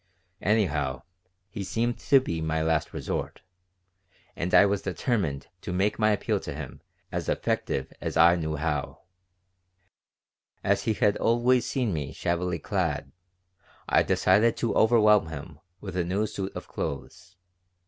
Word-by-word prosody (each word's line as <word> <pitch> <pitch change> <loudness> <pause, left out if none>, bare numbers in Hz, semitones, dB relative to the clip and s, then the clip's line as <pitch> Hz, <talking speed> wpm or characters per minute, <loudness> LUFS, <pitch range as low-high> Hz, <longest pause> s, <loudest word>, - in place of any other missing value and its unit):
Anyhow, 75 - 0 0.4
he 100 0 -6
seemed 115 +5 -1
to 140 - +5
be 85 -11 -3
my 80 0 -1
last 80 -1 0
resort, - - -4 0.9
and 90 +2 -3
I 105 - +7
was 100 -1 0
determined 90 - -1 0.2
to - - -5
make 100 +4 0
my 110 0 +4
appeal 105 - 0
to - - -6
him - - -8 0.3
as - - -3
effective 65 - -1
as - - -3
I 85 +1 +7
knew 80 -2 -2
how 75 -2 -3 1.6
As - - +1
he 110 - +2
had 105 -2 +2
always 120 +1 +2
seen 125 -8 -1
me 75 -2 -4
shabbily 85 0 -1
clad, 70 -3 -2 0.8
I - - +4
decided 115 +2 +3
to 115 - 0
overwhelm 105 -5 +5
him 80 0 -8 0.2
with 95 -3 -7
a 90 - +1
new 95 +5 0
suit 100 -2 -5
of - - -7
clothes. 70 +5 -6
95 Hz, 145 wpm, -27 LUFS, 80-110 Hz, 1.6 s, I